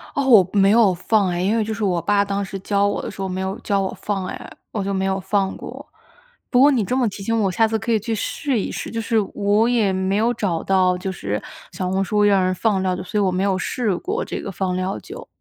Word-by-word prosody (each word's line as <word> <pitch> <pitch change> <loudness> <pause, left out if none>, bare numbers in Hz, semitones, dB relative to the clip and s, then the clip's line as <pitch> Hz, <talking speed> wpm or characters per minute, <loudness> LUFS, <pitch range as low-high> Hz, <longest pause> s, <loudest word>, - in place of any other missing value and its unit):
哦， 280 - 0
我 205 -8 +6
没 195 -1 +4
有 215 -4 +5
放 200 +3 +1
哎， 175 -1 -1
因 200 +4 +1
为 225 - +2
就 220 +1 -3
是 220 0 -4
我 180 -4 +1
爸 200 +4 +2
当 200 0 -2
时 195 0 -6
教 200 +1 +1
我 - - -1
的 - - -5
时 - - -8
候 190 - -2
没 185 +1 -3
有 190 +2 -3
教 200 -2 0
我 190 - -3
放 195 -2 -2
哎， - - -7 0.2
我 210 - -2
就 200 +1 -2
没 190 0 0
有 190 0 0
放 195 0 -1
过。 - - -9 0.7
不 245 - +4
过 285 +3 +7
你 245 -6 +1
这 250 +6 -1
么 250 -3 +2
提 200 - -9
醒 230 +2 0
我 195 -2 +1
下 225 +4 +3
次 220 0 0
可 225 +2 -3
以 220 - +3
去 225 +2 -3
试 260 +4 -2
一 - - -3
试， - - -5
就 230 - -4
是 225 0 +1 0.2
我 210 +3 +2
也 220 -6 +2
没 190 +1 0
有 230 +3 +2
找 190 -8 -2
到 185 -1 +2
就 190 +1 -4
是 105 - -4 0.3
小 185 -1 -3
红 190 +1 +1
书 210 +2 +1
让 200 -2 +4
人 185 0 +1
放 200 -1 +1
料 185 -1 0
酒， - - -6
所 210 +3 -2
以 - - +2
我 190 - +2
没 185 +1 -1
有 195 -1 +1
试 210 +2 -1
过 415 - -3
这 - - -5
个 - - -5
放 185 0 -2
料 185 +1 -2
酒。 470 +5 -10
200 Hz, 300 characters per minute, -21 LUFS, 190-220 Hz, 0.7 s, 过